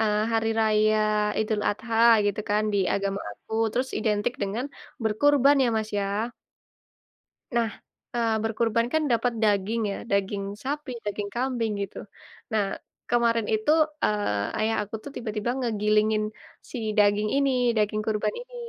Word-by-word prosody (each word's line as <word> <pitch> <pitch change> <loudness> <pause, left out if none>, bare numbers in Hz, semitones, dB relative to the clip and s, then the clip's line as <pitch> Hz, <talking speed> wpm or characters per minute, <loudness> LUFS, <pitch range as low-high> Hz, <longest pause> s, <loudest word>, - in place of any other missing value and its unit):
eee, 210 -1 +2
hari 225 0 +1
raya 215 0 +3 0.4
Idul 215 -1 0
Adha, 225 +2 -3 0.3
gitu 205 +1 0
kan, 210 +1 +3
di 200 - +2 0.2
agama 200 0 -1
aku, 105 - -16 0.2
terus 260 +2 0
identik 210 +2 0
dengan 210 +6 -2 0.4
berkurban, 280 +6 +4
ya - - +2
Mas 220 0 -1
ya. 200 - 0 1.5
Nah, 230 -2 +2 0.4
eee, 230 -2 +1
berkurban 225 +1 +1
kan 315 - +2
dapat 235 +1 +2
daging 210 +2 +2
ya, 195 - -3
daging 200 0 0 0.2
sapi, 285 0 -3
daging 205 0 -3
kambing, 240 -3 -1
gitu. 195 - -6 0.6
Nah, 205 -3 0 0.3
kemarin 235 -2 +2
itu, 220 +5 +1 0.3
eee, 105 - 0
ayah 220 +1 +1
aku 210 +1 -9
tuh 285 - -8
tiba-tiba 220 -1 -2
ngegilingin 215 -2 +2 0.5
si 255 - -5 0.2
daging 205 0 +4
ini, 275 -1 +3 0.3
daging 215 0 +1
kurban 210 -1 0
ini, - - -13
215 Hz, 140 wpm, -26 LUFS, 210-235 Hz, 1.5 s, berkurban